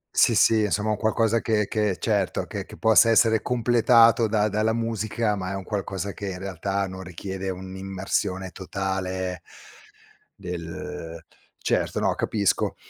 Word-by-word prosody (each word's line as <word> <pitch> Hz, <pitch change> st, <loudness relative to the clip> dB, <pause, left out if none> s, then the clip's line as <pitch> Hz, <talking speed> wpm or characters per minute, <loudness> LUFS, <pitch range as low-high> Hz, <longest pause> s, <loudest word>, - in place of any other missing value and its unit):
Sì, -, -, +5 dB
sì, 110 Hz, -1 st, +5 dB
insomma, 105 Hz, +1 st, 0 dB
un 105 Hz, -, 0 dB
qualcosa 115 Hz, +1 st, +1 dB
che 105 Hz, -2 st, +1 dB
che 105 Hz, -4 st, 0 dB
certo, 100 Hz, -5 st, 0 dB
che -, -, -6 dB
che -, -, -12 dB
possa 110 Hz, +1 st, +5 dB
essere 110 Hz, -1 st, +4 dB
completato 115 Hz, -1 st, +4 dB
da 105 Hz, -1 st, +2 dB
dalla 110 Hz, +2 st, +1 dB
musica, 110 Hz, -1 st, -1 dB
ma 95 Hz, 0 st, -4 dB
è -, -, -3 dB
un 95 Hz, -, -5 dB
qualcosa 100 Hz, -1 st, -3 dB
che, 100 Hz, -1 st, -5 dB
in 90 Hz, -, -5 dB
realtà, 95 Hz, +1 st, -2 dB
non 95 Hz, 0 st, -8 dB
richiede 95 Hz, +1 st, -6 dB
un'immersione 95 Hz, 0 st, -3 dB
totale 95 Hz, -1 st, -3 dB, 1.0 s
del 90 Hz, -2 st, -7 dB, 0.4 s
certo, -, -, -1 dB
no -, -, +1 dB
capisco, 100 Hz, -4 st, 0 dB
100 Hz, 145 wpm, -25 LUFS, 95-110 Hz, 1.0 s, Sì